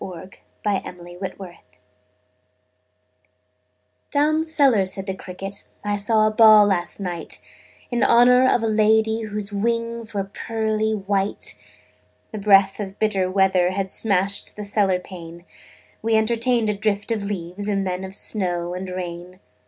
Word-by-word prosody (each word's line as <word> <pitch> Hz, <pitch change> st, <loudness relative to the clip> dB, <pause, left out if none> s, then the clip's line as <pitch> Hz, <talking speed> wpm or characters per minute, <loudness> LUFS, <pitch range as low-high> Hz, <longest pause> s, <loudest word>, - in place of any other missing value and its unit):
The 185 Hz, 0 st, -8 dB, 0.3 s
Potato's 180 Hz, -2 st, -4 dB
Dance 180 Hz, -, -13 dB, 2.3 s
"Down 305 Hz, +2 st, +2 dB
cellar," 280 Hz, -10 st, +3 dB
said 190 Hz, +1 st, -1 dB
the 190 Hz, -, -3 dB
cricket, 195 Hz, +2 st, -8 dB, 0.2 s
"I 205 Hz, 0 st, 0 dB
saw 215 Hz, +1 st, +2 dB
a 215 Hz, -, +2 dB
ball 215 Hz, -1 st, +7 dB
last 185 Hz, -3 st, -1 dB
night 175 Hz, -4 st, -4 dB, 0.5 s
In 240 Hz, -1 st, 0 dB
honor 250 Hz, +2 st, +5 dB
of 235 Hz, -, +1 dB
a -, -, +1 dB
lady 220 Hz, +1 st, +2 dB
Whose 210 Hz, -1 st, -5 dB
wings 230 Hz, +2 st, -2 dB
were 200 Hz, -, 0 dB
pearly 220 Hz, +2 st, -2 dB
white. 200 Hz, 0 st, -2 dB, 0.8 s
The 215 Hz, -, -5 dB
breath 195 Hz, -1 st, +4 dB
of 195 Hz, -1 st, -6 dB
bitter 195 Hz, -4 st, 0 dB
weather 185 Hz, -1 st, +2 dB
Had 190 Hz, 0 st, -3 dB
smashed 195 Hz, -2 st, +1 dB
the 210 Hz, -, -6 dB
cellar 200 Hz, -2 st, +1 dB
pane: 170 Hz, -2 st, -11 dB, 0.6 s
We 225 Hz, 0 st, +1 dB
entertained 230 Hz, 0 st, +2 dB
a -, -, -1 dB
drift 205 Hz, +1 st, -2 dB
of 220 Hz, -2 st, 0 dB
leaves 200 Hz, 0 st, -4 dB
And 195 Hz, -1 st, 0 dB
then 185 Hz, 0 st, -3 dB
of 190 Hz, 0 st, -4 dB
snow 175 Hz, -5 st, -1 dB
and 185 Hz, +1 st, -5 dB
rain. 180 Hz, 0 st, -7 dB
200 Hz, 140 wpm, -22 LUFS, 185-220 Hz, 2.3 s, ball